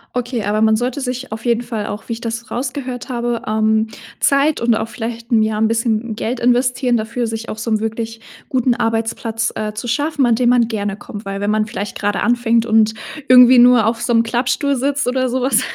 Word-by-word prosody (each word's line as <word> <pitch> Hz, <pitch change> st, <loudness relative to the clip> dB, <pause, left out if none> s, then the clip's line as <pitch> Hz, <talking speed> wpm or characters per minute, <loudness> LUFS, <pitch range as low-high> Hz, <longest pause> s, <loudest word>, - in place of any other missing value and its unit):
Okay, 245 Hz, -2 st, -2 dB
aber 210 Hz, +2 st, 0 dB
man 220 Hz, 0 st, +4 dB
sollte 245 Hz, +4 st, -2 dB
sich 255 Hz, -1 st, -4 dB
auf 220 Hz, +2 st, -7 dB
jeden 235 Hz, 0 st, +2 dB
Fall 225 Hz, -4 st, -4 dB
auch, 210 Hz, +3 st, -7 dB
wie -, -, -1 dB
ich 225 Hz, -, -7 dB
das 230 Hz, 0 st, -5 dB
rausgehört 255 Hz, 0 st, -4 dB
habe, 240 Hz, -1 st, -2 dB
ähm, 220 Hz, 0 st, +1 dB, 0.3 s
Zeit 280 Hz, +2 st, +2 dB
und 235 Hz, -1 st, +2 dB
auch 220 Hz, 0 st, -3 dB
vielleicht, 230 Hz, 0 st, -6 dB
hm, 225 Hz, -2 st, +4 dB
ja 215 Hz, 0 st, 0 dB
'n 220 Hz, +1 st, +2 dB
bisschen 230 Hz, -1 st, -1 dB
Geld 235 Hz, +2 st, -3 dB
investieren 245 Hz, 0 st, +2 dB
dafür, 230 Hz, +2 st, -3 dB
sich 225 Hz, 0 st, -5 dB
auch -, -, -6 dB
so 225 Hz, +1 st, -4 dB
'nen 215 Hz, -, +2 dB
wirklich 225 Hz, +1 st, -4 dB, 0.3 s
guten 255 Hz, -2 st, +1 dB
Arbeitsplatz, 225 Hz, 0 st, -1 dB
äh, 215 Hz, 0 st, -3 dB
zu 215 Hz, +3 st, -6 dB
schaffen, 290 Hz, +3 st, 0 dB
an 235 Hz, -2 st, +3 dB
dem 245 Hz, +1 st, +2 dB
man 245 Hz, -2 st, +3 dB
gerne 205 Hz, -3 st, -3 dB
kommt, 210 Hz, 0 st, -9 dB
weil 195 Hz, 0 st, -5 dB
wenn 205 Hz, +1 st, -1 dB
man 215 Hz, 0 st, +1 dB
vielleicht 205 Hz, -1 st, -5 dB
gerade 205 Hz, -1 st, -1 dB
anfängt 235 Hz, -1 st, +2 dB
und 220 Hz, -1 st, +3 dB, 0.4 s
irgendwie 250 Hz, 0 st, +8 dB
nur 245 Hz, -3 st, +6 dB
auf 225 Hz, +1 st, 0 dB
so 240 Hz, -, -1 dB
'nem 230 Hz, 0 st, +4 dB
Klappstuhl 245 Hz, +4 st, 0 dB
sitzt 275 Hz, +2 st, -1 dB
oder 255 Hz, 0 st, 0 dB
sowas, 260 Hz, +2 st, +1 dB
230 Hz, 215 wpm, -18 LUFS, 220-245 Hz, 0.4 s, irgendwie